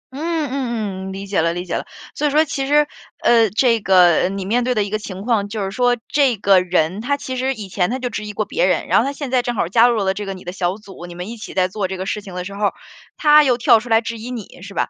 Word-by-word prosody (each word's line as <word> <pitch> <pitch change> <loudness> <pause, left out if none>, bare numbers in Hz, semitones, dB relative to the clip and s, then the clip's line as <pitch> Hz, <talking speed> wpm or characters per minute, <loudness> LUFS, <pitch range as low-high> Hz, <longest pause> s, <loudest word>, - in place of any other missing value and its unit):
嗯， - - -6 0.3
嗯， 220 -8 -3
嗯， - - -5
理 195 +1 -6
解 195 -3 0
了， 165 +1 +1
理 175 +1 -5
解 175 - -5
了。 - - -4 0.3
所 300 - 0
以 - - +2
说 305 +3 +3
其 275 -1 -3
实， 295 +1 +4 0.4
呃， 230 -3 +5
这 230 +1 +2
个 180 -3 +4
你 195 -1 -4
面 240 +4 +1
对 250 0 0
的 210 - +2
一 200 - -6
个 215 - -1
情 195 -2 -7
况 215 -4 0
就 210 -2 -3
是 195 - -3
说， 245 +1 +2
这 270 -6 +2
个 195 -1 +4
人 180 +2 0
他 285 +4 0
其 260 -2 -5
实 260 +1 -1
以 210 -3 -7
前 180 0 0
他 255 - -2
就 250 -2 -4
质 215 - -4
疑 - - -5
过 210 +1 -2
别 190 - 0
人， 180 - +1
然 - - +4
后 235 - +1
他 280 - -1
现 280 -2 -6
在 255 - +3
正 245 -1 -3
好 170 - 0
加 230 +5 +5
入 235 - +1
了 190 0 +1
这 205 0 -6
个 195 - -4
你 185 - -12
的 180 - -5
小 185 -1 -1
组， 195 -4 -11
你 175 - -10
们 180 +4 -6
一 235 - -7
起 215 - -9
在 185 -1 +3
做 195 0 -3
这 190 - -5
个 185 - -4
事 210 - -3
情 190 -3 -10
的 180 0 -4
时 200 - -7
候 205 +1 -1
儿， - - +1 0.4
他 300 -1 +6
又 250 -3 +2
跳 230 -2 +5
出 240 +2 -10
来 225 0 +4
质 230 0 -5
疑 235 +3 -7
你， 225 -7 -8
是 200 0 -10
吧？ - - 0
210 Hz, 335 characters per minute, -19 LUFS, 190-245 Hz, 0.4 s, 他